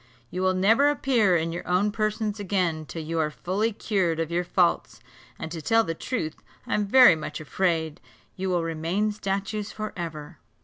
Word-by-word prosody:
You 180 - -3
will 185 0 +2
never 225 +10 +4
appear 240 -10 +2
in 165 0 -2
your 170 - -6
own 185 +4 +2
persons 215 0 -2
again 180 -6 -1
till 165 - -6
you 165 +1 -2
are 155 -1 +1
fully 195 +8 -1
cured 190 -6 -1
of 165 0 -2
your 175 +1 0
faults; 175 -1 +1 0.4
and 160 - -6
to 165 -1 -5
tell 225 +8 +3
the 165 - -3
truth, 165 -4 -4 0.3
I - - -3
am 210 -1 +1
very 250 -4 +8
much 155 - -6
afraid 160 0 -1 0.3
you 190 0 -3
will 175 -2 +1
remain 165 +6 -1
statues 200 +1 -3
for 215 0 -5
ever." 160 -2 -7
185 Hz, 185 wpm, -26 LUFS, 165-210 Hz, 0.4 s, very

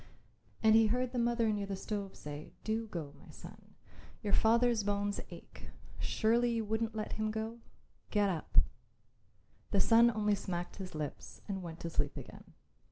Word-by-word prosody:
And 220 0 +7
he 225 0 +7
heard 250 +3 0
the 250 - -1
mother 235 -2 +2
near 205 -1 -2
the 195 - -2
stove 200 0 -4
say, 150 0 -8
"Do 225 +1 -1
go, 160 -8 -5
my - - -16
son. - - -13 0.5
Your 205 - -1
father's 235 0 +4
bones 205 0 0
ache; - - -11 0.3
surely 235 +2 +2
you 225 -1 -1
wouldn't 220 +1 -1
let 215 - -3
him 215 0 -1
go? 220 +2 -4 0.5
Get 205 -1 +3
up." 170 -4 -3 1.1
The 200 - +2
son 230 +4 +6
only 210 -2 +1
smacked 175 -3 -3
his 185 -4 -7
lips 150 -2 -6
and 195 -2 -3
went 170 -2 -7
to 170 - -3
sleep - - -1
again. - - -10
215 Hz, 165 wpm, -33 LUFS, 195-225 Hz, 1.1 s, And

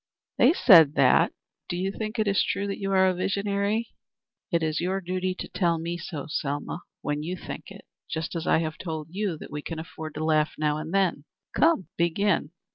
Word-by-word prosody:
"They - - +6
said 165 - +7
that. 135 -3 +5 0.4
Do 175 - -2
you 190 +2 -1
think 215 +2 -5
it 215 -1 +1
is 200 -1 +3
true 200 - -1
that 200 -1 -4
you 195 0 -2
are 190 -1 +4
visionary?" 200 +4 -1 0.6
"It 170 -2 +1
is 155 0 0
your 185 +2 0
duty 185 0 -2
to - - -6
tell 170 -3 +1
me 170 +1 -3
so, 150 -3 -6
Selma, 145 +3 -3 0.2
when 145 0 -1
you 175 +4 -4
think - - -7
it, - - -12 0.2
just 160 +2 -3
as 165 - -3
I - - +5
have 155 -1 -4
told 160 -3 -5
you 195 -3 -2
that - - -10
we 150 0 -4
can 165 +2 -6
afford 160 -1 -7
to 155 +1 -2
laugh 155 -1 +2
now 150 -1 +1
and 155 +1 -5
then. 190 -6 +1 0.3
Come, 320 - +3
begin." 170 -1 +1
170 Hz, 200 wpm, -26 LUFS, 155-195 Hz, 0.6 s, said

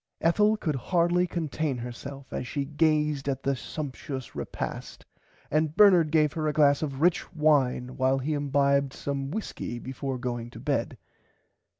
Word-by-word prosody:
Ethel 210 +6 +3
could 155 -7 -1
hardly 175 +5 +2
contain 155 -4 -2
herself 130 +3 -8
as 125 - -3
she 140 +1 -2
gazed 150 -1 +1
at 135 -1 -3
the 140 0 +1
sumpshious 135 -1 -6
repast - - -6 0.5
and 155 0 +1
Bernard 180 -6 +6
gave 150 -1 +3
her 155 -1 -1
a 150 - 0
glass 145 -2 +4
of 140 -3 -3
rich 175 +1 +2
wine 135 -5 +2
while 130 +1 +2
he 140 +4 -2
imbibed 140 -1 +1
some 140 -1 -3
whiskey 170 - -4
before 130 +2 -4
going 120 -2 -4
to - - -11
bed. - - -1
145 Hz, 155 wpm, -27 LUFS, 135-155 Hz, 0.5 s, Bernard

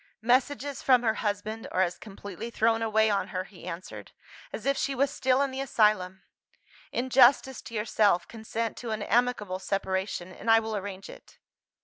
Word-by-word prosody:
"Messages 270 +3 +1
from 250 -2 +4
her 220 -2 +2
husband 215 +1 -3
are 185 - +2
as 175 -1 -3
completely 205 +1 -8
thrown 225 0 +1
away 220 -1 +2
on 200 - 0
her," 185 0 -3
he 185 -2 -14
answered, 180 +1 -8 0.4
"as - - -7
if 275 0 +2
she 275 0 -1
was 275 +2 +1
still 265 -1 +2
in 275 - -2
the 265 +1 -4
asylum. 210 -7 +1 0.7
In 255 +1 -2
justice 265 +1 +5
to 230 - -10
yourself, 210 -4 +2
consent 225 0 -4
to 240 - -6
an 215 -1 -2
amicable 215 -5 0
separation, 190 -1 -2
and - - -5
I 225 0 +7
will 220 -1 -4
arrange 195 -1 -6
it." - - -14
220 Hz, 175 wpm, -28 LUFS, 195-245 Hz, 0.7 s, I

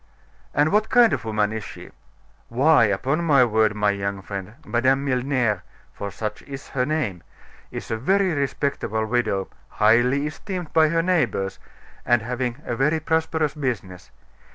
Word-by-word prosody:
"And 150 +2 +3
what 215 +2 +2
kind 245 -3 +5
of - - -3
woman 105 -1 0
is 110 -1 -4
she?" - - -10 0.6
"Why, 135 +2 +4
upon 130 - 0
my 140 -6 +5
word, 110 -2 +2
my 105 -1 +2
young 100 -1 -3
friend, 100 +2 -7
Madame 130 +3 +1
Milner 125 -6 0 0.3
for 100 - -5
such 105 +1 -5
is 135 -1 -9
her 125 -1 -1
name 125 - -2 0.5
is - - -7
a 110 - 0
very 190 - +2
respectable 140 -6 -1
widow 110 -4 0 0.2
(highly 120 +6 +3
esteemed 175 +2 -6
by 160 -1 +5
her 165 +1 +1
neighbors) 120 - 0 0.4
and 120 -3 +2
having 125 0 -3
a 120 - -2
very 150 +6 +1
prosperous 160 -1 0
business. 115 - -4
125 Hz, 155 wpm, -23 LUFS, 105-150 Hz, 0.6 s, kind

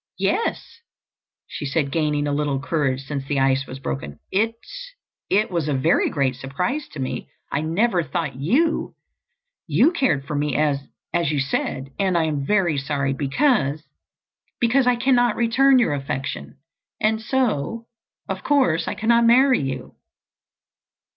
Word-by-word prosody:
"Yes," 460 - -1 0.7
she - - -7
said, 140 0 -1
gaining 150 -2 0
a 145 - -1
little 145 -2 0
courage 140 -3 -1
since 140 -1 -4
the 140 0 -1
ice 135 0 +2
was 130 - -7
broken. 70 - -5
"It—it—was 225 - -2
a 145 - 0
very 145 +6 +2
great 135 -4 0
surprise 180 - -3
to 155 - -8
me. 130 - -4 0.2
I 145 - 0
never 180 +5 +1
thought 160 0 -3
you—you 335 - -1
cared 260 - 0
for 150 - -4
me 145 -2 -1
as—as 150 +2 -1
you 150 - 0
said. 135 0 -2
And 190 -3 +2
I 165 - +2
am 150 -3 -1
very 180 -8 +2
sorry 135 -1 -1
because—because 225 - -1
I 250 - +4
cannot 245 -2 +2
return 260 +4 +4
your 240 -11 +2
affection. 135 -2 -4 0.4
And 220 +1 +1
so, 230 - -1 0.4
of - - -4
course, 260 - +2
I - - -2
cannot 235 +2 +3
marry 255 +2 +5
you." 130 -2 -5
160 Hz, 135 wpm, -22 LUFS, -, 0.7 s, marry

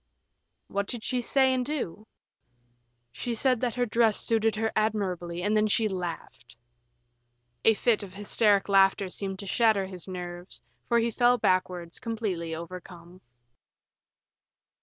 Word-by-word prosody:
"What 200 0 -3
did 235 -2 -5
she 250 -1 -1
say 265 +2 +3
and 255 -1 0
do?" 245 - -4 1.0
"She 235 - -4
said 255 0 +2
that 245 -3 -1
her 245 0 +1
dress 225 -1 +2
suited 225 -2 +1
her 220 0 -1
admirably, 185 -5 -1
and 210 +2 +1
then 215 0 +3
she 215 +1 +2
laughed." 175 - -6 1.1
A 225 - +5
fit 230 0 +2
of 190 -2 -8
hysteric 205 0 +2
laughter 195 -1 +4
seemed 195 +1 -4
to 200 - -7
shatter 215 -1 +2
his 185 -2 -8
nerves, 175 -1 -8 0.2
for 235 - +3
he 235 0 +1
fell 245 +2 +3
backwards, 180 -4 -1
completely 195 -8 -3
overcome. 175 +1 -10
205 Hz, 140 wpm, -27 LUFS, 180-230 Hz, 1.1 s, A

